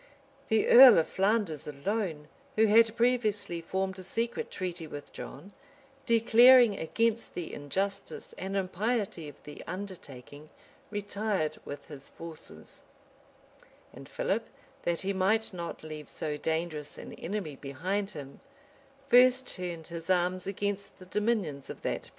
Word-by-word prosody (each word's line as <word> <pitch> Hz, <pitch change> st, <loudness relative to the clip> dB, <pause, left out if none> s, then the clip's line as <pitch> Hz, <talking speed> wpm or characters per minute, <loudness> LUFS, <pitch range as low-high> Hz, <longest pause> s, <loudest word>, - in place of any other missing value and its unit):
The 220 Hz, -1 st, +2 dB
earl 255 Hz, 0 st, +10 dB
of 160 Hz, -, +3 dB
Flanders 195 Hz, -7 st, 0 dB
alone, 155 Hz, +1 st, -3 dB, 0.3 s
who 220 Hz, -, +5 dB
had 225 Hz, +1 st, +5 dB
previously 215 Hz, -8 st, +1 dB
formed 190 Hz, +2 st, -3 dB
a -, -, -8 dB
secret 230 Hz, +5 st, -2 dB
treaty 175 Hz, -3 st, -5 dB
with 145 Hz, -1 st, -9 dB
John, 175 Hz, +9 st, -9 dB, 0.5 s
declaring 235 Hz, 0 st, +7 dB
against 230 Hz, +7 st, -1 dB
the 175 Hz, -, -5 dB
injustice 190 Hz, +8 st, -4 dB
and 195 Hz, +1 st, -3 dB
impiety 195 Hz, -3 st, -1 dB
of 145 Hz, -, -13 dB
the 150 Hz, -, -10 dB
undertaking, 155 Hz, -6 st, -8 dB, 0.4 s
retired 205 Hz, -6 st, -2 dB
with 145 Hz, -, -7 dB
his 140 Hz, -3 st, -11 dB
forces;[] 165 Hz, -2 st, -11 dB, 1.1 s
and -, -, -12 dB
Philip, -, -, -1 dB, 0.3 s
that 170 Hz, -1 st, 0 dB
he 195 Hz, +1 st, -1 dB
might 205 Hz, +3 st, +1 dB
not 170 Hz, -3 st, -6 dB
leave 155 Hz, -2 st, -8 dB
so 150 Hz, -1 st, -4 dB
dangerous 160 Hz, -1 st, -3 dB
an -, -, -9 dB
enemy 175 Hz, -5 st, -4 dB
behind 180 Hz, +10 st, -3 dB
him, 145 Hz, -7 st, -9 dB, 0.7 s
first 255 Hz, +1 st, +6 dB
turned 175 Hz, -3 st, -5 dB
his 170 Hz, +1 st, -8 dB
arms 180 Hz, 0 st, +1 dB
against 200 Hz, 0 st, -3 dB
the 185 Hz, -, -13 dB
dominions 195 Hz, -, -1 dB
of -, -, -8 dB
that -, -, -1 dB
prince. -, -, -16 dB
190 Hz, 135 wpm, -30 LUFS, 160-215 Hz, 1.1 s, earl